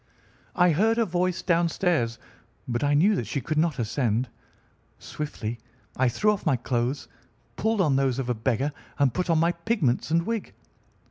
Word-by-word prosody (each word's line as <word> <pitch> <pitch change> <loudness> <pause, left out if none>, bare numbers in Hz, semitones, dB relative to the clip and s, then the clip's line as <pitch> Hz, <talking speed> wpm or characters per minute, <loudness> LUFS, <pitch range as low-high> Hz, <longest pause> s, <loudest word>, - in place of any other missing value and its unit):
I 180 -1 +4
heard 220 +8 +2
her 230 - +3
voice 180 -1 -1
downstairs, 170 -8 +1 0.5
but 120 +1 -1
I 145 0 +3
knew 195 +8 +4
that 120 - -3
she 140 - -2
could 155 +4 -1
not 160 -3 +1
ascend. 120 0 0 0.7
Swiftly 120 -6 -5 0.4
I 130 -1 +2
threw 210 - +2
off 205 - -3
my 155 -6 +2
clothes, 120 +2 -2 0.5
pulled 220 -1 +1
on 145 -7 +3
those 135 -2 +1
of 135 -2 -2
a 125 - +1
beggar, 125 +5 -1 0.3
and 135 -4 +2
put 180 -1 -2
on 165 - +4
my 165 +2 +3
pigments 170 - 0
and 165 +1 +2
wig. 230 -3 -4
150 Hz, 175 wpm, -26 LUFS, 125-180 Hz, 0.7 s, I